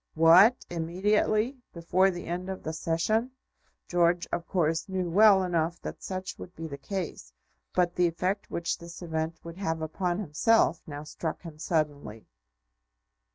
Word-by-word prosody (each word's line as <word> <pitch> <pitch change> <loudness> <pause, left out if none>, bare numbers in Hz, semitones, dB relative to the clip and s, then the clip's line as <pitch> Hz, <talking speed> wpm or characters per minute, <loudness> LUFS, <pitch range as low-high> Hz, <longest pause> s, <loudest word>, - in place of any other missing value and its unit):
"What, 175 +9 +6
immediately; 210 +8 0
before 180 +3 +2
the 175 -2 -5
end 180 +2 -4
of 190 - -5
the 160 - -3
Session?" 165 +10 0 0.6
George, 175 0 +2
of 170 - -3
course, 165 0 0
knew 185 -2 -1
well 200 0 +6
enough 170 -1 0
that - - -7
such 185 0 -5
would 180 - -10
be 165 - -6
the 140 -3 -7
case, 170 - -5 0.4
but 175 -1 +2
the 180 0 +3
effect 185 +4 -2
which 170 0 -2
this 170 +1 -10
event 160 0 -2
would 170 +1 -9
have 165 -5 -2
upon 175 +3 -2
himself 195 +1 +2
now 145 -1 -6
struck 155 +2 -5
him 160 -3 -10
suddenly. 145 -9 -2
170 Hz, 155 wpm, -28 LUFS, 160-190 Hz, 0.6 s, What